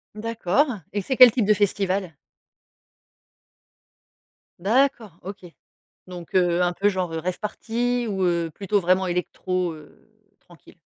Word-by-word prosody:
D'accord 225 +3 0 0.3
et 205 - -2
c'est 260 +7 -2
quel 250 -1 +9
type 230 -2 0
de 210 - +5
festival? 195 -3 -1 2.5
D'accord. 225 - 0
OK. 190 0 -9 0.6
Donc, 180 -2 -10
heu, 175 -1 +3
un 175 0 +1
peu 195 +3 +1
genre 185 -3 -2
rave 165 +3 -3
party 240 +3 -2
ou, 195 -2 -2
heu, 170 -2 0
plutôt, 200 +3 -1
vraiment 185 +1 +2
électro, 180 0 -2
heu, 155 +7 -16 0.3
tranquille? 175 -2 -19
190 Hz, 125 wpm, -23 LUFS, 175-215 Hz, 2.5 s, quel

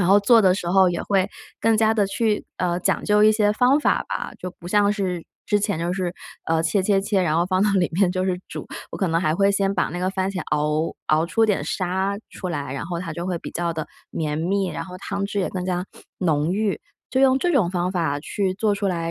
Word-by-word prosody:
然 175 - +2
后 200 +2 +6
做 230 +3 +5
的 185 -1 +5
时 175 -3 -4
候 190 0 +5
也 175 - -3
会 195 -1 +1 0.3
更 225 -1 +3
加 220 0 +3
地 205 -3 +2
去， 210 +1 0
呃， 175 0 -1
讲 - - 0
究 210 0 +4
一 215 - +7
些 210 -1 +3
方 250 +6 +4
法 300 - +1
吧。 - - -4
就 185 - -5
不 175 - -11
像 205 +2 +3
是 185 -5 -2 0.2
之 205 -1 +1
前 200 -5 -1
就 170 +2 -1
是， 180 -2 -2 0.3
呃， 160 0 +1
切 195 +3 +1
切 195 0 +3
切， 195 0 +1
然 160 -3 +1
后 170 - +3
放 185 +1 +1
到 210 - +3
里 185 -3 +2
面 185 +1 +3
就 185 0 -1
是 180 -1 -1
煮。 - - -7 0.2
我 - - -6
可 190 - 0
能 165 0 +1
还 155 -3 +1
会 200 +3 +3
先 200 0 +1
把 185 - +1
那 175 - -5
个 185 - 0
番 190 0 -1
茄 185 - -4
熬， 150 +2 0
熬 155 +2 +3
出 225 +6 +2
点 210 -3 +1
沙 190 +2 -1
出 185 - -6
来， 140 -5 -3
然 140 +4 -4
后 170 -1 -3
它 165 -2 -5
就 170 +2 -5
会 180 -2 -1
比 - - -8
较 170 0 -2
地 160 -2 -4 0.2
绵 150 -2 -2
密， 190 +3 0
然 - - -4
后 180 -1 -9
汤 200 +1 -3
汁 200 0 -2
也 185 - -1
更 185 -1 -3
加 180 -1 -1 0.3
浓 155 -3 +1
郁。 210 -2 0 0.3
就 260 - +1
用 265 -1 +5
这 350 +5 +1
种 215 - +3
方 180 0 -1
法 160 -5 0
去 190 +4 -2
做 210 0 +1
出 200 0 -2
来， 170 -2 -2
185 Hz, 275 characters per minute, -23 LUFS, 175-205 Hz, 0.3 s, 一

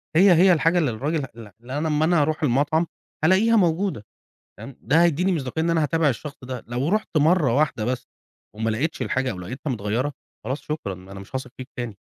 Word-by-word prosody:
هي 185 +3 +7
هي 180 +2 +6
الحاجة 165 +1 +2
اللي 150 -7 +1
الراجل 145 +6 -2
ال 115 -3 -11
اللي 130 +4 -5
أنا 155 +2 -1
أما 155 0 +2
أنا 170 -1 +3
أروح 155 +2 0
المطعم 150 +5 +2 0.4
هالاقيها 195 +7 +4
موجودة، 175 - +1 0.5
تمام؟ 135 -2 -10
ده 145 +8 +3
هيديني 175 +3 +2
مصداقية 150 0 -2
إن 170 - +1
أنا 165 -1 +2
هاتابع 160 +1 +2
الشخص 145 +3 -4
ده. 125 -2 -6
لو 125 +4 -1
رحت 215 -3 -1
مرة 150 -4 +3
واحدة 145 -7 +1
بس، 125 +2 -2 0.5
وملقتش 115 +9 -1
الحاجة، 130 0 0
أو 95 - -6
لقيتها 125 - -5
متغيرة، 115 +5 -1 0.3
خلاص 135 +3 -3
شكرًا، 150 -10 -4
أنا 95 +2 -11
مش 100 - -14
هاثق 130 -1 -6
فيك 130 0 -7
تاني. 120 -5 -4
145 Hz, 200 wpm, -23 LUFS, 125-165 Hz, 0.5 s, هي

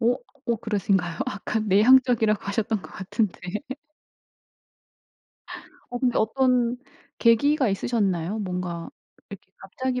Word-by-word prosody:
오. 245 +2 +2 0.3
오 235 - +2
그러신가요? 195 -5 -1
아까 215 -2 -3
내향적이라고 220 +1 +4
하셨던 210 +1 -1
것 - - -11
같은데. 190 +1 -2 2.5
어 245 - -3
근데 245 -2 +1
어떤 250 +1 +2 0.4
계기가 260 +3 +3
있으셨나요? 195 -2 -1
뭔가 180 -3 -4 0.4
이렇게 195 -1 -11
갑자기 250 +6 -3
220 Hz, 260 characters per minute, -25 LUFS, 195-245 Hz, 2.5 s, 내향적이라고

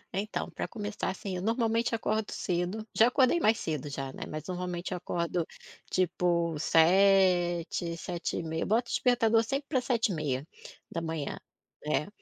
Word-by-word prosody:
Então, 205 +2 -2
pra - - -4
começar, 210 -2 -4
assim, 190 0 -4
eu - - -4
normalmente 230 +2 +1
acordo 215 -1 -1
cedo 180 +5 -2
já 225 - +6
acordei 255 +5 +3
mais 225 -7 +4
cedo 150 - -3
já, 135 -1 -5
né, - - -10
mas 155 0 -5
normalmente 180 0 -3
acordo, 175 -1 -1 0.5
tipo 170 -2 +1
7, 175 0 +3
7h30, 165 -2 -3
boto 235 +3 +1
despertador 230 -2 +3
sempre 275 +5 -2
pra 260 -5 +2
7h30. 165 - -3 0.5
É. 150 0 0
180 Hz, 130 wpm, -30 LUFS, 170-225 Hz, 0.5 s, já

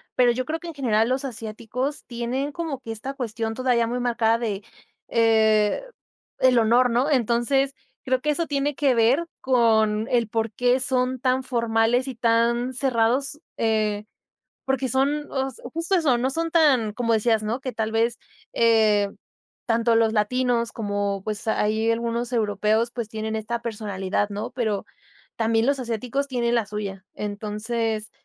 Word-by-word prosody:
pero 245 -1 +5
yo 255 +2 -2
creo 320 +1 -3
que 345 - -9
en 335 - -6
general 230 -6 +1
los 260 +2 0
asiáticos 235 +3 -4
tienen 245 +4 -3
como 310 -3 -4
que 230 - -7
esta 225 +5 -5
cuestión 225 -4 -3
todavía 245 -1 +1
muy 245 +2 -2
marcada 230 -2 +2
de, 210 -4 -3 0.5
eh, 220 - +3 0.6
el 255 -1 +4
honor, 235 +2 +4
¿no? 245 +5 +1
Entonces, 265 +1 +2 0.3
creo 260 0 0
que 300 - +1
eso 330 +2 -1
tiene 285 0 -1
que 270 -3 +2
ver 240 +8 +3
con 220 -4 +2
el 235 -2 +2
porqué 230 +3 +1
son 255 -1 +1
tan 260 0 +1
formales 235 0 +1
y 265 - -5
tan 235 +2 +1
cerrados, 255 +2 +1 0.2
eh, 215 -2 0 0.6
porque 265 0 0
son 280 +4 0
os 265 -1 -2 0.2
justo 335 +4 0
eso. 300 -9 +3
No 255 +2 0
son 330 +4 -2
tan 270 -10 +3
como 230 +1 -1
decías 220 0 +2
¿no? 225 +4 -2
Que 255 -1 -5
tal 220 0 -2
vez, 230 +1 +1 0.4
eh, 220 -3 +3 0.6
tanto 230 0 +2
los 225 -1 +3
latinos 235 +2 +1
como 205 -2 -2
pues, 215 +1 -4
ahí 220 +1 +1
algunos 235 +1 -2
europeos, 215 +1 +1
pues, 235 -2 -4
tienen 220 0 -4
esta 235 +2 -3
personalidad, 205 -3 -2
¿no?, 205 +1 -5
pero 220 -5 -2 0.5
también 225 0 +2
los 280 +1 +1
asiáticos 250 +3 -2
tienen 240 -3 0
la 230 -2 +1
suya. 200 -2 -6
Entonces, 215 +1 -3
235 Hz, 155 wpm, -24 LUFS, 220-260 Hz, 0.6 s, pero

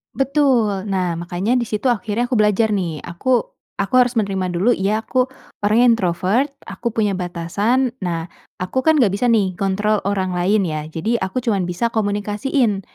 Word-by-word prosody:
Betul, 250 -8 +1
nah 180 -3 -1
makanya 185 +8 0
di 235 - -1
situ 220 +4 0
akhirnya 225 0 -1
aku 250 - +1
belajar 210 +1 +3
nih 170 -7 -2
aku, 230 +8 0 0.4
aku 195 - -4
harus 250 0 +3
menerima 195 -4 0
dulu 205 +8 +3
ya 210 +2 0
aku 255 0 +1 0.3
orangnya 215 +4 +3
introvert, 195 +8 0
aku 235 - -6
punya 210 -3 +2
batasan, 200 +9 0
nah 170 -2 -3 0.3
aku 185 +8 -1
kan 315 0 +5
nggak 240 -10 +4
bisa 225 +5 0
nih 205 -5 +2
kontrol 205 +2 +1
orang 190 -2 0
lain 190 +4 +2
ya, 155 -3 -3
jadi 215 +9 -1
aku 210 +6 -2
cuman 200 -7 0
bisa 230 +7 -1
komunikasiin 210 +1 0
205 Hz, 165 wpm, -20 LUFS, 185-235 Hz, 0.4 s, kan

